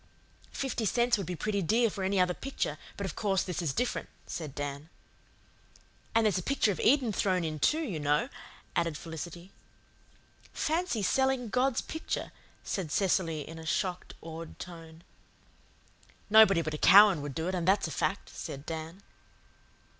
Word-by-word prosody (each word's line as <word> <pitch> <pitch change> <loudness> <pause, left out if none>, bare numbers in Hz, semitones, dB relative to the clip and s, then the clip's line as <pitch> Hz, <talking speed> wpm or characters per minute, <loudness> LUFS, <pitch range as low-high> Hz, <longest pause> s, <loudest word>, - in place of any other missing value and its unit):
"Fifty 265 -4 -2
cents 240 +3 +3
would 190 - -4
be 180 - -3
pretty 200 +3 -1
dear 225 +7 +3
for 200 -2 -4
any 190 +1 +1
other 180 0 +3
picture, 275 +8 -3 0.2
but - - -3
of - - -5
course 195 -3 +1
this 180 -2 -3
is 160 -5 0
different," 245 - -2 0.2
said 155 -5 -6
Dan. 145 +2 -5 1.3
"And 225 -1 +4
there's 200 -3 +2
a - - -4
picture 240 0 +1
of 190 - -4
Eden 245 -2 +3
thrown 185 -2 +1
in, 155 -2 -3
too, 310 - +2
you 195 - -3
know," 150 - +1 0.5
added 165 -3 0
Felicity. 170 +3 -8 1.0
"Fancy 315 - -1
selling 265 +2 +1
God's 250 +3 +1
picture," 320 - -4 0.3
said 180 -7 -3
Cecily 170 -5 0
in 165 0 -8
a 160 - -9
shocked, 180 +1 -2
awed 165 0 -8
tone. 165 -2 -10 1.3
"Nobody 205 -6 +7
but 155 - -3
a 150 - -4
Cowan 195 -4 +8
would 145 -2 -6
do 160 +1 -2
it, 185 - -1
and 175 -1 -2
that's 195 -2 +3
a - - -6
fact," - - -1
said 140 +2 -7
Dan. 165 +4 -6
185 Hz, 165 wpm, -30 LUFS, 160-220 Hz, 1.3 s, Cowan